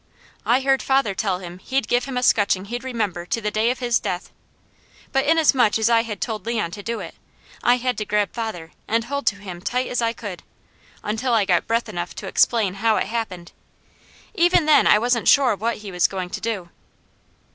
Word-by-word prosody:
I 250 Hz, +3 st, +4 dB
heard 270 Hz, 0 st, +2 dB
father 265 Hz, -6 st, +1 dB
tell 190 Hz, -1 st, -1 dB
him 180 Hz, -1 st, -9 dB
he'd 265 Hz, +7 st, -2 dB
give 245 Hz, 0 st, +1 dB
him 265 Hz, -2 st, -4 dB
a 250 Hz, -, -1 dB
scutching 200 Hz, -5 st, +2 dB
he'd 240 Hz, +4 st, -5 dB
remember 210 Hz, -9 st, -2 dB
to 230 Hz, -, -1 dB
the 210 Hz, -1 st, -2 dB
day 220 Hz, +2 st, +1 dB
of 250 Hz, -, -1 dB
his 240 Hz, -2 st, +1 dB
death; 180 Hz, +1 st, -4 dB, 0.8 s
but 270 Hz, +1 st, +1 dB
inasmuch 285 Hz, -8 st, +4 dB
as 220 Hz, +1 st, +2 dB
I 230 Hz, -1 st, +5 dB
had 225 Hz, -3 st, -6 dB
told 220 Hz, -3 st, -4 dB
Leon 220 Hz, -8 st, -1 dB
to 205 Hz, -, -7 dB
do 230 Hz, +3 st, -4 dB
it, -, -, -8 dB, 0.5 s
I 245 Hz, +1 st, +4 dB
had 250 Hz, -1 st, -2 dB
to 215 Hz, -, -2 dB
grab 210 Hz, -1 st, 0 dB
father 215 Hz, -9 st, -5 dB, 0.2 s
and 230 Hz, +1 st, +1 dB
hold 280 Hz, +4 st, -4 dB
to 205 Hz, -, +3 dB
him 185 Hz, -3 st, -9 dB
tight 250 Hz, +6 st, -1 dB
as 245 Hz, -, -1 dB
I 230 Hz, -1 st, +1 dB
could, 200 Hz, -7 st, -7 dB, 0.6 s
until 230 Hz, +3 st, 0 dB
I 210 Hz, -3 st, +3 dB
got 175 Hz, -3 st, +1 dB
breath 230 Hz, +1 st, 0 dB
enough 175 Hz, -4 st, -5 dB
to -, -, -7 dB
explain 210 Hz, -1 st, +2 dB
how 225 Hz, -1 st, +3 dB
it -, -, 0 dB
happened. 200 Hz, -7 st, -4 dB, 0.8 s
Even 350 Hz, -4 st, +3 dB
then 305 Hz, -1 st, +5 dB
I -, -, +6 dB
wasn't 235 Hz, 0 st, 0 dB
sure 265 Hz, -6 st, +5 dB
what 225 Hz, +4 st, -2 dB
he 210 Hz, -2 st, -9 dB
was 180 Hz, -1 st, +3 dB
going 185 Hz, -2 st, -5 dB
to -, -, -5 dB
do. 205 Hz, -6 st, -3 dB
225 Hz, 210 wpm, -22 LUFS, 200-245 Hz, 0.8 s, I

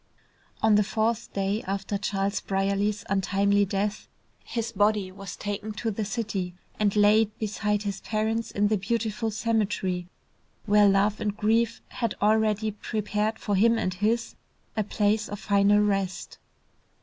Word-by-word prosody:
On 220 Hz, -1 st, +5 dB
the 210 Hz, 0 st, +5 dB
fourth 220 Hz, +2 st, -1 dB
day 200 Hz, +2 st, -1 dB
after 195 Hz, +1 st, -2 dB
Charles 200 Hz, 0 st, -1 dB
Brierly's 200 Hz, +2 st, 0 dB
untimely 200 Hz, +1 st, +2 dB
death, 200 Hz, +2 st, -2 dB, 0.4 s
his 230 Hz, -1 st, -3 dB
body 205 Hz, -2 st, +1 dB
was 195 Hz, 0 st, -8 dB
taken 205 Hz, +1 st, -4 dB
to 225 Hz, +1 st, -2 dB
the 215 Hz, +1 st, -3 dB
city 200 Hz, -5 st, -3 dB, 0.2 s
and 210 Hz, -1 st, +2 dB
laid 210 Hz, +1 st, +4 dB
beside 210 Hz, -1 st, -1 dB
his 200 Hz, -2 st, -4 dB
parents 220 Hz, +1 st, -1 dB
in 205 Hz, 0 st, +1 dB
the 215 Hz, -2 st, +1 dB
beautiful 225 Hz, +2 st, -1 dB
cemetery 205 Hz, -5 st, -1 dB, 0.6 s
where 205 Hz, -1 st, +5 dB
love 200 Hz, +2 st, +2 dB
and 210 Hz, -1 st, -2 dB
grief 225 Hz, +2 st, +1 dB
had 230 Hz, -4 st, -2 dB
already 215 Hz, 0 st, +2 dB
prepared 210 Hz, +1 st, -2 dB
for 205 Hz, -, -3 dB
him 230 Hz, +4 st, +4 dB
and 185 Hz, -4 st, -1 dB
his, 215 Hz, +5 st, 0 dB, 0.4 s
a 215 Hz, -, +1 dB
place 210 Hz, +1 st, 0 dB
of 205 Hz, -, -5 dB
final 200 Hz, 0 st, +3 dB
rest. 195 Hz, -3 st, -1 dB
210 Hz, 145 wpm, -26 LUFS, 200-220 Hz, 0.6 s, On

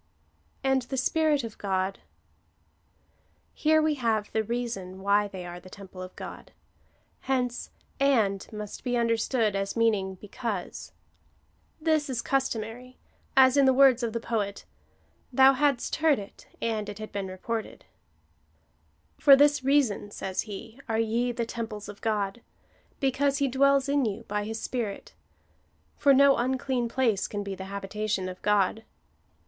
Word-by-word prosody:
And 265 Hz, -1 st, +2 dB
the 265 Hz, +2 st, -5 dB
Spirit 300 Hz, +1 st, +2 dB
of 225 Hz, -2 st, -8 dB
God. 190 Hz, -1 st, -1 dB, 1.5 s
Here 315 Hz, 0 st, +3 dB
we 310 Hz, 0 st, +2 dB
have 225 Hz, -6 st, -1 dB
the 220 Hz, -, 0 dB
reason 215 Hz, -5 st, -4 dB
why 205 Hz, +1 st, +3 dB
they 190 Hz, -3 st, -8 dB
are 175 Hz, 0 st, -7 dB
the 185 Hz, +1 st, -14 dB
temple 190 Hz, -1 st, -11 dB
of 185 Hz, 0 st, -9 dB
God. -, -, -9 dB, 0.7 s
Hence 250 Hz, -2 st, -2 dB, 0.3 s
and 225 Hz, -9 st, +2 dB
must 210 Hz, -1 st, -7 dB
be 245 Hz, -2 st, 0 dB
understood 230 Hz, -2 st, +1 dB
as 195 Hz, +3 st, -2 dB
meaning 205 Hz, -4 st, +1 dB
because. 210 Hz, 0 st, -5 dB, 0.9 s
This 310 Hz, -2 st, +1 dB
is 245 Hz, -3 st, -2 dB
customary, 250 Hz, -2 st, -2 dB, 0.4 s
as 260 Hz, +1 st, +7 dB
in 280 Hz, -, +6 dB
the 265 Hz, -, +5 dB
words 260 Hz, -2 st, +6 dB
of 235 Hz, -2 st, -1 dB
the 230 Hz, -, -2 dB
poet 210 Hz, -4 st, -3 dB, 0.2 s
— 80 Hz, +1 st, -38 dB
" 85 Hz, -, -39 dB
Thou 265 Hz, +2 st, +7 dB
hadst 280 Hz, -2 st, +1 dB
heard 310 Hz, -3 st, +4 dB
it, 200 Hz, -1 st, -10 dB
and 215 Hz, -2 st, -2 dB
it 205 Hz, -, -7 dB
had 215 Hz, 0 st, -7 dB
been 200 Hz, -1 st, -3 dB
reported." 215 Hz, +4 st, -5 dB, 0.7 s
" 80 Hz, +1 st, -40 dB
For 275 Hz, -, +8 dB
this 290 Hz, 0 st, +4 dB
reason," 265 Hz, -7 st, +2 dB
says 190 Hz, -2 st, -3 dB
he, 225 Hz, +4 st, -8 dB
" -, -, -31 dB
are 220 Hz, -, +1 dB
ye 230 Hz, +2 st, +1 dB
the 235 Hz, -1 st, -2 dB
temples 225 Hz, -3 st, -6 dB
of 205 Hz, -1 st, -10 dB
God, 210 Hz, 0 st, -1 dB, 0.6 s
because 275 Hz, 0 st, +1 dB
He 280 Hz, -, +1 dB
dwells 275 Hz, +1 st, +3 dB
in 280 Hz, -2 st, +2 dB
you 205 Hz, -3 st, -3 dB
by 210 Hz, 0 st, -3 dB
his 220 Hz, +1 st, -4 dB
Spirit; 225 Hz, -6 st, -4 dB, 0.8 s
for 285 Hz, -, +4 dB
no 275 Hz, 0 st, +6 dB
unclean 255 Hz, -1 st, -1 dB
place 230 Hz, -5 st, +1 dB
can 205 Hz, -1 st, -4 dB
be 200 Hz, -1 st, -5 dB
the 190 Hz, 0 st, -7 dB
habitation 200 Hz, 0 st, -3 dB
of 185 Hz, 0 st, -8 dB
God." 210 Hz, +1 st, +2 dB
225 Hz, 155 wpm, -27 LUFS, 200-265 Hz, 1.5 s, For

